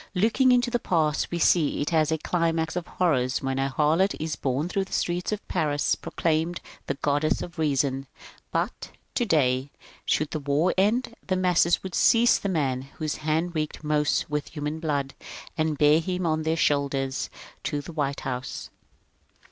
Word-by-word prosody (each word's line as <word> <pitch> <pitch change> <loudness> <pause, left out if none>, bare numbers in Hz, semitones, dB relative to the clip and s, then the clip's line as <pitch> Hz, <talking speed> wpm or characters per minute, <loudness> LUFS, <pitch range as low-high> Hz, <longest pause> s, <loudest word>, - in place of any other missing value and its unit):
Looking 230 +7 +3
into 245 0 +3
the 240 - +1
past, 155 -7 +1
we 175 - -2
see 165 -2 +3
it 150 - -1
as 160 -1 +3
a 160 - +2
climax 165 0 0
of 180 -2 -3
horrors 135 -8 0
when 135 0 -1
a 135 0 +1
harlot 155 +8 +2
is 155 0 -2
borne 135 +4 -1
through 195 +1 -1
the - - -11
streets 175 +3 -1
of 210 - -4
Paris 150 -4 +1
proclaimed 165 +1 -1 0.3
the 140 - -1
Goddess 145 +2 0
of 170 -1 -9
Reason; 135 -3 0 0.4
but - - -2 0.2
today, 140 - +2 0.3
should 155 0 0
the 155 - -2
war 145 +5 +1
end, 230 +5 +1
the 185 - +1
masses 180 -2 +3
would 190 -2 -6
seize 235 +1 +5
the 200 - -2
man 135 -7 0 0.2
whose 155 -1 -2
hand 160 +3 -1
reeked 155 -1 -3
most 150 -2 +1
with 150 -1 -2
human 150 0 -4
blood, 145 -4 -1 0.4
and 155 -2 0
bear 150 +1 +5
him 180 +1 -2
on 155 -1 +1
their 160 +1 0
shoulders 140 -3 0 0.4
to 145 - -1
the 155 +4 -8
White 140 -3 -2
House. 130 -1 -5
155 Hz, 170 wpm, -26 LUFS, 145-175 Hz, 0.4 s, seize